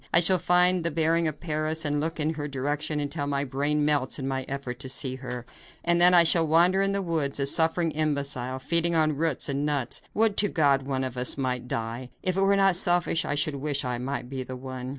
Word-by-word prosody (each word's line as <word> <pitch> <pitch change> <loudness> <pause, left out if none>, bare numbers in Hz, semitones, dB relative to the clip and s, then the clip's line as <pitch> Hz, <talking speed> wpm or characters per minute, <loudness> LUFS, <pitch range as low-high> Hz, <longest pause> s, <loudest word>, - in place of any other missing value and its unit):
I 170 - +6
shall 180 +2 +3
find 180 0 +3
the 170 - +1
bearing 165 +1 +1
of 150 -1 -4
Paris, 155 -1 -2
and 145 0 0
look 160 +2 -3
in 155 +1 0
her 150 -2 -5
direction 145 +2 -3
until 145 0 -3
my 140 -1 -1
brain 145 +2 -1
melts 145 -3 0
in 135 -2 -5
my 130 -1 -3
effort 135 -3 -6
to 135 -1 -5
see 130 -1 -1
her, 125 -2 -7 0.4
and 170 0 +2
then 180 +1 +7
I 175 -1 +7
shall 165 0 +3
wander 175 +5 +3
in 195 0 +1
the 200 0 -1
woods, 155 -5 -2
a 140 - +1
suffering 165 +3 +2
imbecile, 140 -4 -2
feeding 170 +5 +1
on 155 -2 +2
roots 155 -1 0
and 140 0 -2
nuts. 145 -5 -1
Would 220 -1 +2
to 205 - +3
God 140 -4 +1
one 130 -1 -2
of 130 -1 -5
us 125 +2 +1
might 125 -2 -3
die. 115 +2 -5
If 185 -1 0
it 195 - 0
were 195 +1 +3
not 195 -2 +4
selfish, 175 -2 +2
I - - -2
should 145 0 0
wish 140 -1 -2
I 125 -1 -3
might 130 0 -4
be 130 0 -5
the 130 0 -7
one." 130 0 -7
150 Hz, 235 wpm, -26 LUFS, 135-165 Hz, 0.4 s, then